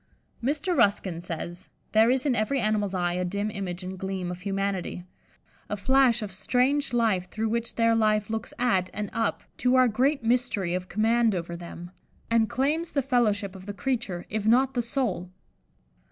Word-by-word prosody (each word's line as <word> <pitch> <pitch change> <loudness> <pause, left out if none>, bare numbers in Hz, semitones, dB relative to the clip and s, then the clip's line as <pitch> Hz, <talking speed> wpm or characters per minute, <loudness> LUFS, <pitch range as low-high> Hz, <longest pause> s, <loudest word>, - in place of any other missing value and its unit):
'" - - -31
Mr. 295 +7 0
Ruskin 195 - +2
says, 175 +1 -6 0.2
"There 220 +2 +5
is 260 +2 +2
in 275 - +3
every 245 +5 +1
animal's 210 -3 0
eye 175 -1 0
a 180 +1 -1
dim 200 +4 -2
image 185 -3 -5
and 185 0 -6
gleam 190 -2 -3
of 180 0 -7
humanity, 195 -2 -2 0.7
a 210 - -2
flash 250 +1 +3
of 205 - -5
strange 250 +9 +1
life 220 -7 +1
through 220 0 -2
which 235 +1 -2
their 230 0 +3
life 215 -2 +2
looks 225 0 -3
at 190 -7 +1
and 210 -1 -4
up 225 -2 -1
to 250 +1 +2
our 255 -1 +6
great 260 +4 +1
mystery 225 -7 +1
of 180 0 -3
command 225 0 +2
over 170 -1 -4
them, 170 0 -9 0.4
and 225 -2 +3
claims 305 +6 0
the 280 - +1
fellowship 210 -7 +1
of 190 +1 -11
the 205 - -5
creature, 225 -8 -2
if 215 0 -2
not 255 +4 +5
of - - -26
the 245 - +1
soul!" 230 -7 -2
215 Hz, 185 wpm, -27 LUFS, 190-245 Hz, 0.7 s, our